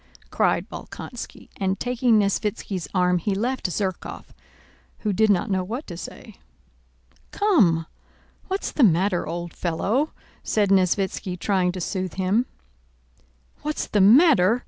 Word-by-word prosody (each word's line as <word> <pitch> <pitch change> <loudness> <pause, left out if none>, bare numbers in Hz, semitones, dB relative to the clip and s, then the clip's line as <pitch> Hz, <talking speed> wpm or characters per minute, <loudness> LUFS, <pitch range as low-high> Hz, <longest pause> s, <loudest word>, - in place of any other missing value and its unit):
cried - - +1
Bolkónski, 245 - -9
and 190 -1 -1
taking 245 -2 +2
Nesvítski's 200 -4 -1
arm 180 -1 +2
he 195 +3 -1
left 240 0 -1
Zherkóv, 185 0 -3 0.8
who 210 -2 0
did 220 +3 +3
not 200 0 +2
know 190 -1 +1
what 235 +10 -5
to 175 - -8
say. 170 - -10 0.9
"Come, 200 - +3 0.6
what's 385 +1 -2
the - - -1
matter, 185 -1 +3
old 170 +1 -5
fellow?" 210 - -1 0.3
said 205 -2 +1
Nesvítski 190 -1 +1
trying 185 -1 +1
to 185 - -5
soothe 185 0 -3
him. 195 +7 +1 1.1
"What's 300 +1 -2
the 205 - +1
matter?" 235 - +6
195 Hz, 125 wpm, -24 LUFS, 180-230 Hz, 1.1 s, matter